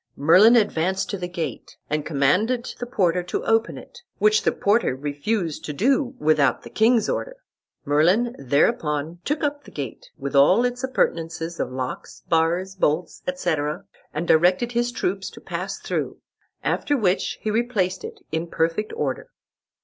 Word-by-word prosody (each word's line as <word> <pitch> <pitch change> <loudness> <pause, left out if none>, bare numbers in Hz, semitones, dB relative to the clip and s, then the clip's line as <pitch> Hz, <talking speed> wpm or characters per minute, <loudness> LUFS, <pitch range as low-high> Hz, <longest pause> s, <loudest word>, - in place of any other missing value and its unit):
Merlin 185 +11 +6
advanced 190 -4 +1
to 200 - -2
the 180 - -3
gate, 165 - -6
and 150 0 -1
commanded 185 - +1
the 245 - -4
porter 180 -6 +1
to 175 - -4
open 225 0 +1
it, - - -12 0.2
which 215 +1 +4
the - - +2
porter 205 - +1
refused 150 +5 -2
to 150 - -4
do, 260 - +1
without 150 - +2
the - - -11
king's 225 0 +3
order. - - -3 0.5
Merlin 180 - +3
thereupon 150 - 0
took 295 +1 -1
up 290 0 -1
the - - -13
gate, 135 -6 -7
with 140 -1 -5
all 185 - +5
its 245 +1 -3
appurtenances 170 -9 -1
of - - -2
locks, 130 0 -6
bars, 170 +3 +1
bolts, 170 -2 -1
etc., 160 - -1 0.3
and 165 +3 -3
directed 180 +9 +3
his 240 0 0
troops 195 -4 -2
to - - -13
pass - - -5
through, - - -3 0.5
after 290 - 0
which 195 -5 0
he 215 - -2
replaced 210 -5 0
it - - -8
in 160 +2 -2
perfect 165 +6 -1
order. 475 +2 -3
180 Hz, 155 wpm, -23 LUFS, 155-230 Hz, 0.5 s, Merlin